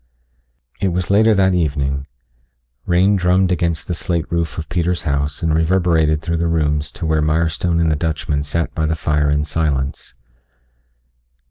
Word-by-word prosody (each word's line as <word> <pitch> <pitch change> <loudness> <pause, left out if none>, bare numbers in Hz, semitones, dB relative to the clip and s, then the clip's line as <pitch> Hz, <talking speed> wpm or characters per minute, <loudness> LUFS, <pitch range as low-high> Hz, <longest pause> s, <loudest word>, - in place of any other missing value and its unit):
It 95 - 0
was 90 +1 -1
later 110 +2 +4
that 95 -1 +3
evening. 70 -5 -1 0.8
Rain 95 +4 +3
drummed 90 +1 +2
against 85 -2 -1
the 90 - -2
slate 85 -1 -2
roof 85 -2 -2
of 80 - -5
Peter's 90 +2 -1
house 70 0 -2
and 80 -1 +1
reverberated 80 -2 +2
through 85 0 -1
the 85 +1 0
rooms 75 -2 0
to 85 - -5
where 80 -1 +1
Mirestone 80 +2 0
and 80 -1 +2
the - - +2
Dutchman 75 -2 -2
sat 80 +3 -2
by 80 -1 -1
the 80 - 0
fire 75 -2 0
in 75 0 +1
silence. 70 -4 -2
80 Hz, 160 wpm, -19 LUFS, 75-85 Hz, 0.8 s, later